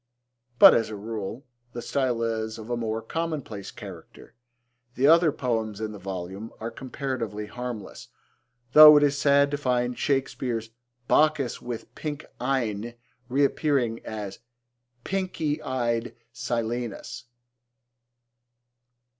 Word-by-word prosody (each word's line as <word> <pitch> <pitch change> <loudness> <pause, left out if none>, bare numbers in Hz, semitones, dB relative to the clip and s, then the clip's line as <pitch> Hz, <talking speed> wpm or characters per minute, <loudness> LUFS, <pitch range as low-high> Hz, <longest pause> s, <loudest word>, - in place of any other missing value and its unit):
But, - - +10
as 115 - +1
a 110 - -5
rule, 110 +4 -6 0.3
the 120 - -5
style 125 -4 0
is 110 -1 -2
of 110 +1 -8
a - - +1
more 115 -1 -3
commonplace 145 -9 -4
character. - - -11 0.6
The 130 - +2
other 165 +1 +6
poems 110 -6 -2
in 110 -1 -3
the 105 - -9
volume 95 +3 -6
are 115 +1 -4
comparatively 125 -5 -4
harmless, 120 -1 -7 0.7
though 150 0 +11
it 145 - +4
is 145 -1 +3
sad 140 0 +4
to 145 - -1
find 125 -3 0
Shakespeare's 125 -5 -1 0.4
'Bacchus 150 -5 +2
with 120 -2 -7
pink 150 -1 -5
eyne' 120 -3 -1 0.3
reappearing 135 -3 +1
as 105 -3 -6 0.6
'pinky 165 -6 -2
eyed 120 -3 -2 0.2
Silenus.' 120 -2 -3
120 Hz, 115 wpm, -26 LUFS, 110-140 Hz, 0.7 s, though